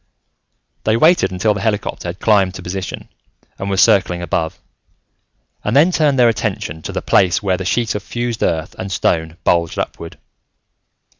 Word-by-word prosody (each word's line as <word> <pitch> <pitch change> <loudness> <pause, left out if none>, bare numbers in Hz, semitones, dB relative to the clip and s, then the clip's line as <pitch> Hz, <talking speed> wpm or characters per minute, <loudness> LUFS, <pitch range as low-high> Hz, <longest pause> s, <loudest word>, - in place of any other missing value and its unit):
They 110 +1 +2
waited 165 - +4
until 100 +4 +1
the 100 - -5
helicopter 105 -4 -2
had 85 +2 -6
climbed 100 -4 +2
to - - -8
position 95 +1 -5 0.5
and 100 - -3
was 95 0 +2
circling 90 -3 +2
above, 80 -2 -2 1.1
and 105 - -1
then 155 +6 +5
turned 150 -5 +2
their 125 -1 +5
attention 105 -7 -2
to - - -6
the - - -4
place 95 +1 +2
where 95 -2 +1
the 95 - -5
sheet 115 +3 0
of 105 - -3
fused 120 +2 -4
earth 80 0 -1
and 95 +1 -5
stone 80 -2 0
bulged 85 -1 +1
upward. 85 - -5
100 Hz, 165 wpm, -18 LUFS, 90-115 Hz, 1.1 s, then